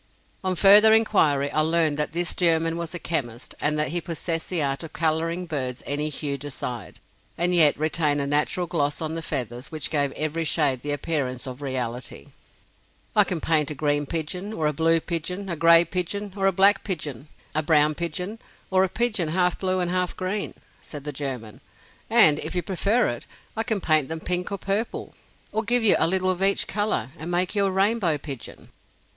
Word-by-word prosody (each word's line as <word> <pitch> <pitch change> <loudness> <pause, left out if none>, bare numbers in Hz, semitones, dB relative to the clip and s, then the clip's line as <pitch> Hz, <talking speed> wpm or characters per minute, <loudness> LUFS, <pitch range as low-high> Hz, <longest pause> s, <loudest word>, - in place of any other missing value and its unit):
On 185 -1 0
further 205 +4 +7
inquiry, 150 -11 +2
I - - +1
learned 160 -2 +1
that 150 - -1
this 175 +1 -1
German 165 -2 +2
was 170 +1 -5
a - - -2
chemist, 130 -9 -3
and 150 +1 +1
that 150 -2 0
he 175 +3 0
possessed 165 0 -2
the 175 -5 +1
art 135 -1 -1
of 165 -2 -9
coloring 165 +2 -1
birds 130 -6 -4
any 150 +2 0
hue 140 -1 -4
desired, 125 -6 -6 0.4
and 175 +1 +1
yet 155 -4 +6
retain 155 -1 +1
a 140 - 0
natural 150 +5 0
gloss 150 -4 -1
on 160 -1 -4
the 165 - -4
feathers, 125 -3 -4
which 155 -3 -3
gave 145 -3 +1
every 155 +2 -2
shade 145 -5 +1
the 145 - -3
appearance 140 -4 -2
of 130 +1 -8
reality. 125 -3 -5 0.9
"I - - +7
can 175 - -3
paint 155 -3 +1
a 150 - -5
green 145 0 0
pigeon 180 +7 -4
or 160 - -2
a 150 - +1
blue 165 +2 +2
pigeon, 180 +4 -4
a 170 - -2
gray 165 +1 +6
pigeon 185 +3 -3
or 195 -1 +1
a - - +4
black 195 +2 +4
pigeon, 155 - -4 0.3
a 155 - +1
brown 155 -1 +3
pigeon 180 +7 -4 0.3
or 190 0 +4
a 190 - 0
pigeon 215 -5 0
half 180 +2 +1
blue 185 -1 0
and 175 -1 -1
half 180 -1 -1
green," 190 +2 -3 0.3
said 145 -3 -9
the 150 0 -5
German; 130 -6 -6 0.5
"and 150 -1 +6
if - - -5
you 180 - -1
prefer 200 +7 +1
it, 120 - -6 0.3
I 225 - -1
can 225 -3 -1
paint 155 -5 +2
them 160 0 -4
pink 180 +3 -2
or 200 - -2
purple, 200 +4 -3 0.4
or 220 - 0
give 240 +2 +1
you 215 - +6
a - - +3
little 185 +1 +2
of 185 0 -4
each 195 +1 +3
color, 205 - -1
and 160 +3 -6
make 175 +1 0
you 200 -2 +2
a - - -1
rainbow 195 -4 +1
pigeon." 135 -4 -8
165 Hz, 200 wpm, -24 LUFS, 145-185 Hz, 0.9 s, further